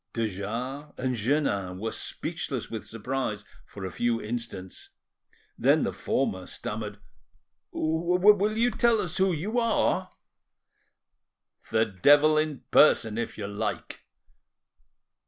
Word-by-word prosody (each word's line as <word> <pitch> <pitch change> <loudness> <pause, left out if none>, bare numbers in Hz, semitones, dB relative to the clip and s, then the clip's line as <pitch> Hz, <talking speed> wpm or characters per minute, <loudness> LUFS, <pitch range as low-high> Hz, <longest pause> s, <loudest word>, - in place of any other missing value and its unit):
De 115 -1 0
Jars 120 +9 -5
and 130 0 -1
Jeannin 105 -7 0
were 110 +3 -3
speechless - - -4
with 110 -2 -6
surprise 115 -2 -3 0.2
for 100 -2 -8
a 95 - -4
few 120 +2 0
instants; 105 -5 -6 0.7
then - - +4
the - - -1
former 95 -1 -1
stammered— 105 -1 -5 0.7
"Will 180 +6 +3
you 240 +2 +3
tell 235 -2 +3
us 185 -6 -3
who 190 0 +3
you 200 +9 -1
are?" 230 -1 +1 1.6
"The 110 0 +3
devil 145 +10 +5
in 155 -2 0
person, 115 -7 +5
if 120 - -4
you 105 - -4
like. 105 +1 -4
120 Hz, 120 wpm, -27 LUFS, 105-155 Hz, 1.6 s, devil